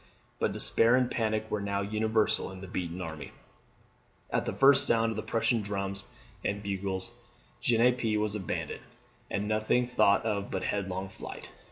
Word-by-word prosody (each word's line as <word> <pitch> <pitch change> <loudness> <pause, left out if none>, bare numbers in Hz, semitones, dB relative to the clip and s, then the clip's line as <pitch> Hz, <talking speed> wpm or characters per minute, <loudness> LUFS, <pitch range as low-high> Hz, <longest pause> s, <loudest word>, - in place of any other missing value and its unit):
But - - +1
despair 115 +2 +3
and 125 -1 +2
panic 110 -1 0
were 105 - 0
now 100 0 -1
universal 110 0 +1
in 95 -1 -10
the 95 - -7
beaten 90 0 -4
army. 80 -3 -7 1.0
At - - 0
the - - +1
first 135 0 +6
sound 115 0 +3
of - - -4
the 110 - -2
Prussian 115 +1 +1
drums 100 -1 -3 0.4
and 100 +1 -2
bugles, 95 +1 -3 0.5
Genappe 120 -2 +3
was 105 -1 0
abandoned, 100 -5 -3 0.5
and 100 +1 -2
nothing 110 +3 +2
thought 110 -4 +3
of 100 -2 -1
but 95 - -3
headlong 95 -1 -2
flight. 95 - -9
105 Hz, 160 wpm, -30 LUFS, 95-115 Hz, 1.0 s, first